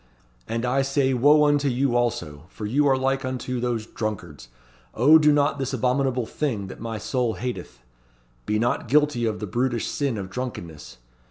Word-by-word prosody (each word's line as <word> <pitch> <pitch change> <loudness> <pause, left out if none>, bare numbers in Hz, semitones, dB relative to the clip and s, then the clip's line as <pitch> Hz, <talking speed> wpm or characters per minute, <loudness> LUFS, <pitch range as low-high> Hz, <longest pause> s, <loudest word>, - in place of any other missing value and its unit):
And 115 +1 -2
I 130 +2 +2
say 135 0 +1
Wo 145 +4 +5
unto 145 -1 +2
you 130 -1 +1
also, 80 -11 -2
for 105 - -7
you 140 +7 +2
are 135 -1 +3
like 135 +1 0
unto 130 -1 -3
those 120 -2 -2
drunkards. 90 - -6 0.5
'O 150 +7 +6
do 150 -1 +5
not 145 0 +2
this 135 0 -3
abominable 130 0 0
thing 115 -7 -3
that - - -10
my 115 -1 -4
soul 120 +1 -1
hateth.' 120 - -6 0.7
Be 105 - +1
not 120 +1 0
guilty 145 -2 +2
of 110 -2 -2
the 105 - -4
brutish 120 +3 -1
sin 140 -6 -2
of 95 -2 -6
drunkenness. 85 - -7
125 Hz, 175 wpm, -24 LUFS, 110-135 Hz, 0.7 s, O